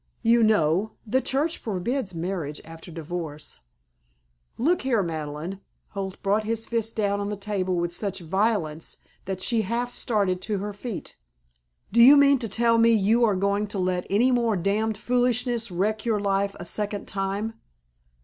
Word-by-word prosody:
"You 235 +1 +5
know 205 -1 +2
the 255 +5 +1
Church 295 +6 0
forbids 210 0 -2
marriage 165 -4 -3
after 165 +2 -11
divorce." 160 -2 -6 1.0
"Look 330 +9 +2
here, 240 -6 +1
Madeleine!" 160 +3 -5 0.3
Holt 195 -2 -5
brought 205 +2 +2
his 225 +1 -2
fist 230 -1 -2
down 205 -2 0
on 200 0 -2
the 210 - -3
table 195 -2 -2
with 175 0 -1
such 195 +1 -2
violence 175 -3 -1 0.3
that 185 -1 -4
she 230 -3 +2
half 235 +4 -2
started 200 -7 0
to 210 +1 -2
her 205 +2 -4
feet. 210 0 -7 0.7
"Do 235 +3 +5
you 280 +4 +9
mean 280 -1 +5
to 230 -3 -3
tell 230 +3 +3
me 230 0 +6
you 220 +3 +3
are 210 -4 +3
going 200 +2 0
to 205 - -6
let 180 -1 -1
any 235 +6 +3
more 235 -4 +2
damn 210 +4 0
foolishness 245 0 0
wreck 210 +4 -1
your 225 -3 +1
life 200 0 0
a 175 - -6
second 205 +2 -3
time?" 200 +3 -2
205 Hz, 165 wpm, -25 LUFS, 185-230 Hz, 1.0 s, you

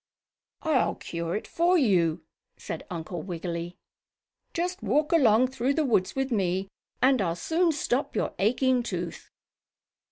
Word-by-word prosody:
"I'll 310 -5 +2
cure 170 +1 -4
it 215 - -3
for 350 +2 +2
you!" 175 - +2 0.3
said 160 - -7
Uncle 170 0 -5
Wiggily. 170 0 -5 0.7
"Just 355 +2 -2
walk 290 +9 +1
along 250 -5 +5
through 265 +1 0
the 315 - +1
woods 190 -8 +1
with 270 0 -1
me 190 -2 0 0.3
and 260 -3 +5
I'll 170 -3 0
soon 330 - +1
stop 280 -2 -1
your - - -1
aching 250 +4 +2
tooth." 175 -7 -5
225 Hz, 135 wpm, -27 LUFS, 175-275 Hz, 0.7 s, along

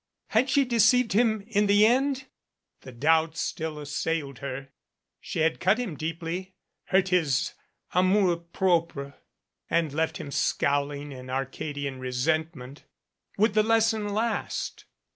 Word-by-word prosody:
Had 240 +5 +2
she 275 +1 +3
deceived 245 -1 +4
him 220 -1 +2
in 210 -2 +1
the 205 +1 +6
end? 265 +3 +2 0.5
The 130 - -11
doubt 160 +6 +2
still 160 -3 -3
assailed 145 -2 -3
her. 135 0 -6 0.5
She - - -4
had 160 0 +1
cut 190 +4 +3
him 235 -10 -3
deeply, 165 +4 -5 0.3
hurt 190 0 +2
his 155 -8 +1 0.4
amour 185 -1 +3
propre 170 -5 -1 0.6
and 165 -3 +1
left 160 0 -1
him 140 - -7
scowling 145 +1 0
in 130 -1 -9
Arcadian 135 +1 -4
re 130 0 -4
sentment. 145 0 -2 0.5
Would 215 +1 +3
the 215 - +4
lesson 220 -1 +2
last? 220 +3 -2
165 Hz, 130 wpm, -27 LUFS, 145-210 Hz, 0.6 s, the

